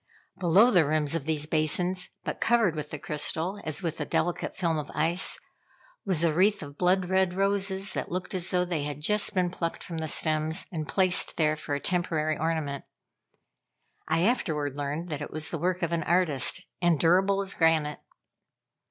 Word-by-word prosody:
Below 190 +7 +5
the 180 -5 +5
rim 155 +1 +1
of 150 0 -2
these 155 -2 -1
basins, 170 +4 -1
but - - -5
covered 225 -8 +3
with 150 -1 -5
the 150 - -5
crystal, 160 +7 -1
as 155 +4 -2
with 165 -3 -3
a - - +1
delicate 175 0 -1
film 165 -4 0
of 150 - -6
ice, 165 +4 +1 0.7
was 175 -4 +3
a 165 -2 +3
wreath 200 +3 +2
of 145 -1 -10
blood 180 +2 +2
red 190 -1 +1
roses, 195 0 0
that - - -3
looked 180 +2 -4
as 180 -2 -1
though 180 0 +1
they 175 -4 -2
had 145 -1 -4
just 210 +5 +1
been 180 -1 +1
plucked 170 -2 -4
from 165 -2 -5
the 160 - -3
stems 155 +3 +1
and 155 -4 -4
placed 185 +1 +2
there 155 -1 +2
for 150 -1 -4
a - - -2
temporary 160 -2 0
ornament. 155 -4 -2 1.2
I 160 +1 +1
afterward 155 - 0
learned 145 +4 -4
that 150 -2 -4
it 150 - -5
was 155 0 -4
the 170 - -3
work 180 +2 -1
of 170 - 0
an 165 - 0
artist, 165 -5 +2 0.2
and 170 -4 +3
durable 190 +4 +3
as 200 0 -2
granite. 160 -3 +2
165 Hz, 185 wpm, -27 LUFS, 155-185 Hz, 1.2 s, Below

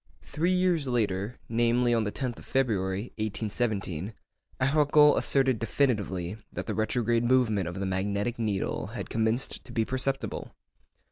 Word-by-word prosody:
Three 165 +4 -1
years 180 -5 +2
later, 105 -3 -1
namely, 120 +1 +2
on 115 -2 +2
the 105 - -2
10th 125 0 -4
of - - -14
February, 105 -5 0
1817, 105 -3 -2 0.4
Arago 150 +2 +5
asserted 130 -4 +3
definitively 105 -7 0
that - - -5
the - - -2
retrograde 115 +1 +1
movement 120 -7 +2
of 90 +2 -5
the 100 - -1
magnetic 100 +5 -1
needle 105 -4 -1
had - - -7
commenced 110 +3 0
to - - -12
be 115 -2 0
perceptible. 135 +2 -3
115 Hz, 140 wpm, -28 LUFS, 100-130 Hz, 0.4 s, Arago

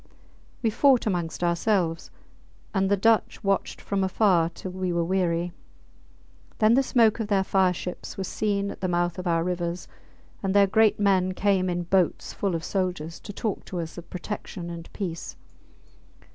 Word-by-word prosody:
We 225 - +2
fought 265 +2 +4
amongst 175 -4 -2
ourselves, 170 -1 +1 0.6
and 195 -1 +1
the 200 - +3
Dutch 225 +3 +2
watched 195 0 0
from 195 -1 -1
afar 185 -3 +3
till 185 +2 -8
we 185 0 -2
were 170 0 +1
weary. 175 -1 0 1.0
Then 220 +1 +4
the 265 - +5
smoke 235 -4 +3
of 220 - -2
their 200 -2 +2
fire 190 -1 +3
ships 180 +3 -6
was 190 -2 -3
seen 200 -2 -1
at - - -11
the 185 - 0
mouth 175 0 0
of 180 - -4
our 165 -1 +2
rivers, 175 0 -3 0.5
and 195 0 -1
their 200 -1 +7
great 215 +2 +3
men 190 -2 +2
came 190 -2 +2
in 175 0 -1
boats 180 0 +1
full 195 -4 -1
of 165 - -3
soldiers 180 -4 -2
to 205 - -8
talk 210 +1 -3
to 180 - -5
us 165 -1 -5
of 175 - -10
protection 180 -2 -6
and 170 -1 -9
peace. 175 -5 -5
185 Hz, 175 wpm, -26 LUFS, 175-200 Hz, 1.0 s, their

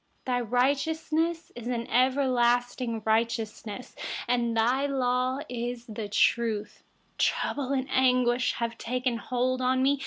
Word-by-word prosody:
142Your 245 -3 -1
righteousness 315 +5 0
is 235 -1 -7
an 235 -1 -2
everlasting 245 -3 +1
righteousness. 225 0 -1 0.3
Your 240 +2 +2
law 255 0 0
is 240 0 -4 0.2
truth. 215 0 +1 0.4
143Trouble 275 -1 0
and 260 0 -2
anguish 250 -1 +3
have 230 -1 -3
taken 250 0 -1
hold 255 +2 -1
of 255 +1 +2
me. 270 +2 +2
250 Hz, 105 wpm, -28 LUFS, 235-260 Hz, 0.4 s, anguish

